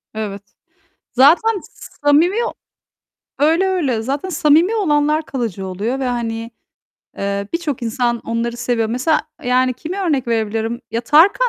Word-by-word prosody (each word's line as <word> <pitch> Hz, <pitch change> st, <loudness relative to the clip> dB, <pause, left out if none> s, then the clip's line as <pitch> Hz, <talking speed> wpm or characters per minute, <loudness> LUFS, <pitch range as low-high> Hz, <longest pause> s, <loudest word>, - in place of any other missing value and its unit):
Evet. 205 Hz, -2 st, -4 dB, 0.7 s
Zaten 350 Hz, -, +5 dB, 0.4 s
samimi 310 Hz, +7 st, +4 dB, 1.0 s
öyle, 325 Hz, +6 st, +3 dB
öyle, 285 Hz, -12 st, 0 dB
zaten 280 Hz, +9 st, -3 dB
samimi 330 Hz, +5 st, +3 dB
olanlar 305 Hz, -5 st, +1 dB
kalıcı 225 Hz, -, -4 dB
oluyor 215 Hz, +8 st, -3 dB
ve, 265 Hz, -, -1 dB
hani, 230 Hz, -1 st, -3 dB, 0.7 s
eee, 200 Hz, 0 st, -2 dB
birçok 310 Hz, -7 st, -2 dB
insan 235 Hz, +1 st, 0 dB
onları 230 Hz, +1 st, -3 dB
seviyor. 240 Hz, -2 st, 0 dB
Mesela, 255 Hz, +7 st, +1 dB, 0.2 s
yani, 255 Hz, +1 st, +2 dB
kimi 330 Hz, +9 st, -6 dB
örnek 285 Hz, -9 st, 0 dB
verebilirim? 225 Hz, +1 st, -1 dB
Ya 230 Hz, -, -1 dB
Tarkan, 340 Hz, -, +4 dB
255 Hz, 125 wpm, -19 LUFS, 230-315 Hz, 1.0 s, Zaten